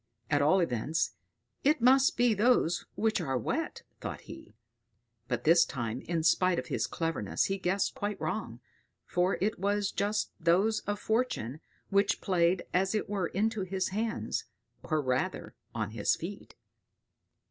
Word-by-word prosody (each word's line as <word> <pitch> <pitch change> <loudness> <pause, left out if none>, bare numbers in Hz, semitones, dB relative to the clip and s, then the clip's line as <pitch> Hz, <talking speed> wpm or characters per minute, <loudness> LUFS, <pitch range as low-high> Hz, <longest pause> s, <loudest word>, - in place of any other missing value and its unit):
"At 145 -1 +3
all 160 +6 +4
events 150 +1 0 0.5
it 295 +2 +3
must 260 +3 +5
be 240 -1 +4
those 210 -5 +2
which 220 -3 +1
are 135 -5 -1
wet," 115 - -3 0.2
thought - - -5
he; - - -12 0.7
but 125 -2 -2
this 165 +2 +6
time, 120 0 -4
in 165 -1 0
spite 180 +2 +3
of - - -2
his - - 0
cleverness, 165 -1 -1
he 195 0 -1
guessed 190 +2 0
quite 205 0 -3
wrong, 125 - -4 0.4
for 180 +2 +1
it 205 +1 0
was 205 +1 0
just 205 +1 -1
those 190 +6 +3
of 205 0 0
Fortune 220 - -1 0.3
which 200 0 +3
played 175 -1 +2
as 190 +3 +2
it 215 - -1
were 195 -4 0
into 220 +2 0
his 185 0 -1
hands, 220 +4 -2 0.4
or 155 -2 -1
rather 130 -1 -1 0.2
on 110 -2 -2
his 105 -2 +1
feet. 195 +5 -8
185 Hz, 150 wpm, -30 LUFS, 160-210 Hz, 0.7 s, this